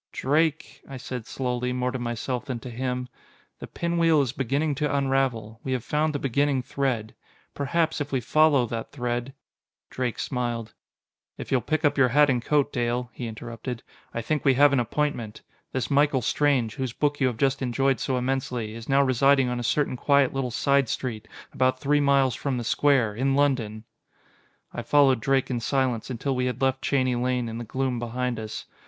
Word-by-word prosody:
"Drake," 155 Hz, +3 st, 0 dB
I 135 Hz, -, -6 dB
said 125 Hz, -2 st, -6 dB
slowly, 125 Hz, -1 st, -2 dB
more 125 Hz, 0 st, -1 dB
to 130 Hz, -, -4 dB
myself 120 Hz, +2 st, -3 dB
than 130 Hz, -4 st, -3 dB
to 125 Hz, -, -8 dB
him, 125 Hz, +1 st, -3 dB, 0.5 s
"the -, -, -7 dB
pinwheel 165 Hz, -3 st, +2 dB
is 125 Hz, -, -2 dB
beginning 140 Hz, +4 st, -1 dB
to 150 Hz, -1 st, +1 dB
unravel. 130 Hz, -5 st, 0 dB
We 130 Hz, -, -2 dB
have 125 Hz, -3 st, -2 dB
found 155 Hz, +1 st, 0 dB
the -, -, +2 dB
beginning 135 Hz, 0 st, 0 dB
thread. 125 Hz, -5 st, -2 dB, 0.4 s
Perhaps, 160 Hz, +2 st, 0 dB
if 145 Hz, -, -4 dB
we 135 Hz, -, +1 dB
follow 145 Hz, +1 st, +3 dB
that 115 Hz, -1 st, -5 dB
thread...." 125 Hz, 0 st, -3 dB, 0.6 s
Drake 125 Hz, -3 st, -2 dB
smiled. 120 Hz, -3 st, -3 dB, 0.6 s
"If -, -, -8 dB
you'll 130 Hz, -2 st, +3 dB
pick 155 Hz, +7 st, -1 dB
up 145 Hz, -1 st, +2 dB
your 130 Hz, -, +6 dB
hat 145 Hz, +2 st, +5 dB
and 120 Hz, -2 st, -1 dB
coat, 145 Hz, 0 st, +1 dB
Dale," 120 Hz, 0 st, -1 dB
he 120 Hz, -, -5 dB
interrupted, 115 Hz, +2 st, -6 dB, 0.3 s
"I 115 Hz, -, -4 dB
think 150 Hz, +4 st, -1 dB
we 135 Hz, -2 st, +4 dB
have 145 Hz, +1 st, +5 dB
an 135 Hz, -, +3 dB
appointment. 120 Hz, -3 st, -2 dB, 0.3 s
This 130 Hz, -1 st, -2 dB
Michael 140 Hz, -2 st, +3 dB
Strange, 130 Hz, -5 st, +1 dB
whose 130 Hz, -3 st, -4 dB
book 145 Hz, +1 st, 0 dB
you 130 Hz, -, +3 dB
have 120 Hz, -3 st, -2 dB
just 135 Hz, +2 st, +1 dB
enjoyed 135 Hz, 0 st, +1 dB
so 130 Hz, -, -1 dB
immensely, 125 Hz, -3 st, -2 dB
is 115 Hz, +2 st, -9 dB
now 140 Hz, +1 st, +4 dB
residing 135 Hz, 0 st, +3 dB
on 125 Hz, 0 st, -2 dB
a -, -, -4 dB
certain 135 Hz, +2 st, 0 dB
quiet 140 Hz, 0 st, +3 dB
little 135 Hz, -2 st, -1 dB
side 140 Hz, +1 st, +2 dB
street 110 Hz, -4 st, -4 dB, 0.3 s
about 130 Hz, 0 st, +1 dB
three 145 Hz, +1 st, +2 dB
miles 140 Hz, -2 st, +3 dB
from 130 Hz, +2 st, -2 dB
the 120 Hz, -, -3 dB
square, 125 Hz, -2 st, +2 dB
in 135 Hz, +5 st, 0 dB
London!" 125 Hz, -7 st, 0 dB, 0.9 s
I -, -, -4 dB
followed 135 Hz, -4 st, +4 dB
Drake 135 Hz, +2 st, +1 dB
in 120 Hz, -, -1 dB
silence, 125 Hz, -1 st, -1 dB
until 130 Hz, +2 st, -2 dB
we 125 Hz, 0 st, 0 dB
had 125 Hz, -1 st, -3 dB
left 130 Hz, 0 st, +1 dB
Cheney 130 Hz, -2 st, +1 dB
Lane 125 Hz, 0 st, 0 dB
in 115 Hz, 0 st, -5 dB
the -, -, -4 dB
gloom 130 Hz, +1 st, -2 dB
behind 120 Hz, 0 st, -2 dB
us. 110 Hz, -1 st, -6 dB
130 Hz, 190 wpm, -25 LUFS, 120-140 Hz, 0.9 s, your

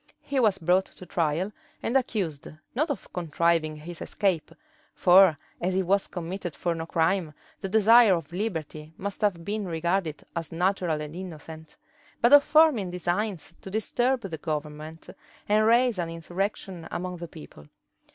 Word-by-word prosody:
He 275 Hz, -, -1 dB
was 215 Hz, -6 st, +3 dB
brought 180 Hz, +2 st, +2 dB
to 185 Hz, -, -12 dB
trial, 170 Hz, +3 st, -1 dB, 0.3 s
and 235 Hz, -, -1 dB
accused, 195 Hz, -, -1 dB, 0.3 s
not 305 Hz, +6 st, 0 dB
of 285 Hz, -, -5 dB
contriving 165 Hz, -2 st, +1 dB
his 160 Hz, +2 st, -9 dB
escape, 185 Hz, -6 st, -1 dB, 0.4 s
(for 180 Hz, -3 st, +6 dB, 0.2 s
as 185 Hz, +1 st, 0 dB
he 190 Hz, -, +2 dB
was 195 Hz, +2 st, +1 dB
committed 175 Hz, -1 st, -5 dB
for 175 Hz, -, -1 dB
no 165 Hz, 0 st, -5 dB
crime, 165 Hz, -1 st, 0 dB, 0.2 s
the 195 Hz, -, -4 dB
desire 220 Hz, 0 st, +6 dB
of 165 Hz, -1 st, -6 dB
liberty 160 Hz, -6 st, -4 dB
must 200 Hz, +1 st, -5 dB
have 180 Hz, -6 st, 0 dB
been 210 Hz, -1 st, -2 dB
regarded 170 Hz, -1 st, -1 dB
as 165 Hz, -2 st, -4 dB
natural 175 Hz, -2 st, 0 dB
and 150 Hz, +1 st, -7 dB
innocent,) 160 Hz, -3 st, -9 dB, 0.4 s
but 240 Hz, +4 st, +4 dB
of 290 Hz, 0 st, +9 dB
forming 305 Hz, -, +4 dB
designs 180 Hz, 0 st, -2 dB
to -, -, -8 dB
disturb 240 Hz, +5 st, 0 dB
the 175 Hz, -7 st, -6 dB
government, 155 Hz, +1 st, -5 dB, 0.4 s
and 215 Hz, +1 st, +3 dB
raise 235 Hz, -2 st, +4 dB
an 170 Hz, -1 st, -2 dB
insurrection 175 Hz, +1 st, -4 dB
among 180 Hz, 0 st, -4 dB
the 170 Hz, 0 st, -7 dB
people. 150 Hz, -, -13 dB
180 Hz, 155 wpm, -27 LUFS, 165-205 Hz, 0.4 s, of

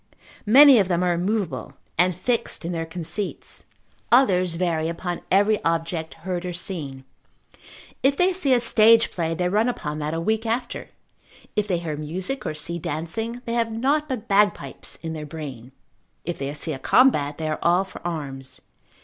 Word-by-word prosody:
Many 270 Hz, +2 st, +9 dB
of 195 Hz, -, +2 dB
them 175 Hz, -1 st, +1 dB
are 180 Hz, -1 st, +2 dB
immovable, 190 Hz, +1 st, -2 dB, 0.2 s
and 180 Hz, +1 st, +3 dB
fixed 235 Hz, -2 st, -2 dB
in 170 Hz, -, -2 dB
their 165 Hz, -1 st, -3 dB
conceits, 180 Hz, +4 st, -5 dB, 0.5 s
others 185 Hz, -9 st, +4 dB
vary 165 Hz, -2 st, 0 dB
upon 175 Hz, +1 st, -4 dB
every 205 Hz, +2 st, +3 dB
object, 165 Hz, 0 st, -1 dB
heard 180 Hz, -2 st, -2 dB
or 180 Hz, -1 st, -4 dB
seen. 150 Hz, -7 st, -3 dB, 1.0 s
If 275 Hz, +1 st, +3 dB
they 365 Hz, +1 st, +3 dB
see 350 Hz, -7 st, 0 dB
a 250 Hz, -, +5 dB
stage 230 Hz, -1 st, +5 dB
play, 165 Hz, -2 st, -2 dB
they 180 Hz, +1 st, 0 dB
run 215 Hz, +6 st, +2 dB
upon 150 Hz, -10 st, -4 dB
that 150 Hz, +2 st, -2 dB
a -, -, -1 dB
week 220 Hz, +6 st, 0 dB
after; 240 Hz, +2 st, -3 dB, 0.7 s
if 210 Hz, -1 st, +1 dB
they 180 Hz, -3 st, +1 dB
hear 160 Hz, -3 st, -4 dB
music, 180 Hz, -, -4 dB
or 155 Hz, -, -3 dB
see 170 Hz, +3 st, -2 dB
dancing, 220 Hz, +12 st, -4 dB
they 230 Hz, -, -3 dB
have 230 Hz, -1 st, 0 dB
nought 285 Hz, +7 st, 0 dB
but 250 Hz, -5 st, -4 dB
bagpipes 200 Hz, -9 st, +1 dB
in 160 Hz, -1 st, -4 dB
their 155 Hz, -1 st, -5 dB
brain: 135 Hz, -6 st, -8 dB, 0.5 s
if 175 Hz, -, -4 dB
they 135 Hz, 0 st, -3 dB
see 155 Hz, +2 st, -4 dB
a 135 Hz, -, -6 dB
combat, 150 Hz, -, +3 dB
they 160 Hz, -, -3 dB
are 155 Hz, -, -2 dB
all 175 Hz, +2 st, +3 dB
for 190 Hz, -, -11 dB
arms. 140 Hz, -6 st, -4 dB
180 Hz, 175 wpm, -24 LUFS, 160-225 Hz, 1.0 s, Many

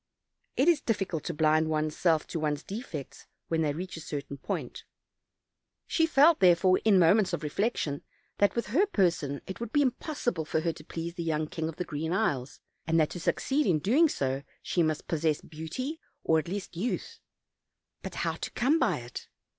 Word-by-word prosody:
It 270 Hz, -, +3 dB
is 335 Hz, -4 st, +5 dB
difficult 195 Hz, -8 st, -1 dB
to 170 Hz, -, -2 dB
blind 155 Hz, +1 st, +3 dB
one's 155 Hz, 0 st, 0 dB
self 165 Hz, -3 st, +2 dB
to 165 Hz, -, -3 dB
one's 150 Hz, -1 st, -1 dB
defects, 190 Hz, -, -7 dB, 0.2 s
when 165 Hz, -1 st, +1 dB
they 150 Hz, -2 st, +1 dB
reach 180 Hz, +5 st, -5 dB
a -, -, -7 dB
certain 140 Hz, -2 st, -6 dB
point; -, -, -4 dB, 1.0 s
she 325 Hz, -1 st, +2 dB
felt, 315 Hz, +2 st, +5 dB
therefore, 185 Hz, +1 st, +5 dB
in 215 Hz, -3 st, +5 dB
moments 185 Hz, +2 st, +4 dB
of 170 Hz, -, -1 dB
reflec 200 Hz, +10 st, -1 dB
tion, 145 Hz, -2 st, -2 dB, 0.4 s
that, 205 Hz, -, +3 dB
with 235 Hz, -, 0 dB
her 355 Hz, -, +3 dB
person, 170 Hz, -, +1 dB
it 190 Hz, -, -7 dB
would 235 Hz, -1 st, -5 dB
be 290 Hz, +2 st, +4 dB
imposible 250 Hz, -, -1 dB
for 160 Hz, -, 0 dB
her 165 Hz, 0 st, 0 dB
to 155 Hz, -, -12 dB
please 165 Hz, +2 st, -5 dB
the 175 Hz, -, -5 dB
young 155 Hz, -1 st, 0 dB
King 160 Hz, +1 st, -3 dB
of 165 Hz, -, -7 dB
the 180 Hz, -, -3 dB
Green 160 Hz, +2 st, -3 dB
Isles, 145 Hz, -, -1 dB, 0.3 s
and 165 Hz, 0 st, +3 dB
that 155 Hz, -, +2 dB
to 175 Hz, -, -5 dB
succeed 275 Hz, -, +1 dB
in 170 Hz, -, +4 dB, 0.3 s
so 135 Hz, -, -1 dB
doing -, -, -17 dB, 0.2 s
she 175 Hz, -, +1 dB
must 155 Hz, -2 st, 0 dB
possess 160 Hz, -2 st, +1 dB
beauty, 165 Hz, -, -5 dB, 0.2 s
or, 160 Hz, 0 st, +3 dB
at 155 Hz, -, -5 dB
least, 190 Hz, 0 st, -5 dB
youth; 215 Hz, +9 st, -3 dB, 0.8 s
bat -, -, -7 dB
how -, -, -1 dB
to -, -, -4 dB
come 285 Hz, +7 st, +2 dB
by -, -, +1 dB
it? 120 Hz, +1 st, -8 dB
170 Hz, 195 wpm, -29 LUFS, 155-215 Hz, 1.0 s, is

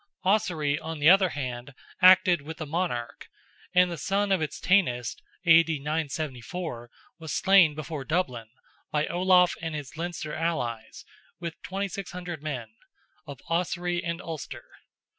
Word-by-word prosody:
Ossory, 175 Hz, -8 st, +1 dB
on 160 Hz, 0 st, -6 dB
the 150 Hz, +3 st, +6 dB
other 190 Hz, -1 st, +5 dB
hand, 130 Hz, -2 st, -5 dB, 0.3 s
acted 180 Hz, -2 st, +7 dB
with 160 Hz, +3 st, -8 dB
the 155 Hz, -, -5 dB
monarch, 150 Hz, -7 st, -3 dB, 0.4 s
and 180 Hz, 0 st, +4 dB
the 170 Hz, -, -5 dB
son 200 Hz, +1 st, 0 dB
of 190 Hz, -4 st, +2 dB
its 155 Hz, -, -3 dB
Tanist 125 Hz, -, +1 dB, 0.2 s
(A.D. 165 Hz, -1 st, +5 dB
974) 150 Hz, -2 st, -4 dB, 0.3 s
was 160 Hz, -2 st, -7 dB
slain 190 Hz, -6 st, +5 dB
before 155 Hz, -1 st, -5 dB
Dublin, 130 Hz, -8 st, -2 dB, 0.4 s
by 150 Hz, 0 st, 0 dB
Olaf 180 Hz, 0 st, +4 dB
and 165 Hz, -2 st, -4 dB
his 145 Hz, -1 st, -7 dB
Leinster 165 Hz, -2 st, -4 dB
allies, 120 Hz, -9 st, -3 dB, 0.3 s
with 170 Hz, -1 st, -6 dB
2,600 180 Hz, -3 st, -5 dB
men, 130 Hz, -7 st, -4 dB, 0.6 s
of 140 Hz, -2 st, -9 dB
Ossory 175 Hz, +1 st, -1 dB
and 170 Hz, 0 st, -3 dB
Ulster. 160 Hz, -4 st, -7 dB
165 Hz, 135 wpm, -27 LUFS, 145-180 Hz, 0.6 s, acted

